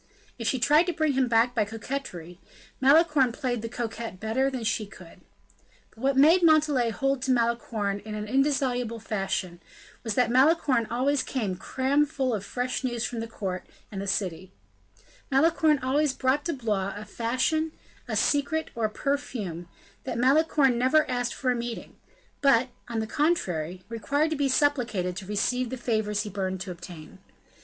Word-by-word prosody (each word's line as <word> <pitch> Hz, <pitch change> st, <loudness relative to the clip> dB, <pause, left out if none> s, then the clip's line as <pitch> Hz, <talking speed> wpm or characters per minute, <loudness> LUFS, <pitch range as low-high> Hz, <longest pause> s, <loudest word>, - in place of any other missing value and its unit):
If 230 Hz, -, -2 dB
she 265 Hz, -, +1 dB
tried 300 Hz, +7 st, +4 dB
to 355 Hz, -, 0 dB
bring 310 Hz, -2 st, +1 dB
him 260 Hz, -1 st, +2 dB
back 235 Hz, +1 st, +3 dB
by 225 Hz, -4 st, +2 dB
coquetry, 205 Hz, -6 st, -6 dB, 0.4 s
Malicorne 285 Hz, -2 st, +5 dB
played 245 Hz, -1 st, -2 dB
the 230 Hz, -, -5 dB
coquette 230 Hz, -4 st, -5 dB
better 230 Hz, +6 st, 0 dB
than 260 Hz, -3 st, -5 dB
she 215 Hz, -1 st, -1 dB
could. 185 Hz, -4 st, -14 dB, 0.7 s
But -, -, -21 dB
what 270 Hz, +2 st, +1 dB
made 320 Hz, +6 st, +6 dB
Montalais 305 Hz, -7 st, +4 dB
hold 270 Hz, +3 st, -1 dB
to 265 Hz, -, 0 dB
Malicorne 230 Hz, -4 st, 0 dB
in 215 Hz, +1 st, -7 dB
an 210 Hz, 0 st, -4 dB
indissoluble 260 Hz, -3 st, 0 dB
fashion, 190 Hz, -4 st, -3 dB, 0.4 s
was 225 Hz, -3 st, -2 dB
that 245 Hz, -2 st, +2 dB
Malicorne 265 Hz, -3 st, +3 dB
always 265 Hz, +4 st, +1 dB
came 215 Hz, -8 st, -2 dB
cram 270 Hz, +9 st, +1 dB
full 265 Hz, -4 st, -1 dB
of 205 Hz, -3 st, -2 dB
fresh 250 Hz, +5 st, -3 dB
news 240 Hz, -2 st, -1 dB
from 235 Hz, -, -4 dB
the 225 Hz, -, -4 dB
court 190 Hz, -5 st, -4 dB, 0.3 s
and 195 Hz, -2 st, -5 dB
the 200 Hz, -, -5 dB
city; 185 Hz, -2 st, -2 dB, 0.8 s
Malicorne 310 Hz, +2 st, +4 dB
always 280 Hz, +2 st, +2 dB
brought 270 Hz, +2 st, 0 dB
to 335 Hz, -, -1 dB
Blois 210 Hz, -7 st, -2 dB
a 210 Hz, +1 st, -7 dB
fashion, 255 Hz, +9 st, 0 dB, 0.4 s
a -, -, -3 dB
secret, 295 Hz, +2 st, +1 dB
or 230 Hz, -1 st, -1 dB
a -, -, 0 dB
perfume; 215 Hz, -, -3 dB, 0.4 s
that 255 Hz, -, -3 dB
Malicorne 270 Hz, -1 st, +3 dB
never 300 Hz, +5 st, +3 dB
asked 245 Hz, -1 st, -1 dB
for 255 Hz, -, 0 dB
a -, -, 0 dB
meeting, 235 Hz, -1 st, -6 dB, 0.5 s
but, 260 Hz, -3 st, +4 dB, 0.2 s
on 230 Hz, -2 st, -2 dB
the -, -, -2 dB
contrary, 185 Hz, -, -1 dB
required 285 Hz, +7 st, -1 dB
to -, -, 0 dB
be 280 Hz, -2 st, 0 dB
supplicated 240 Hz, -10 st, +1 dB
to 190 Hz, 0 st, -7 dB
receive 240 Hz, +4 st, 0 dB
the 260 Hz, -, -5 dB
favors 215 Hz, -3 st, -1 dB
he 210 Hz, -, -6 dB
burned 190 Hz, -1 st, -3 dB
to 185 Hz, 0 st, -5 dB
obtain. 170 Hz, -3 st, -11 dB
245 Hz, 170 wpm, -27 LUFS, 210-275 Hz, 0.8 s, made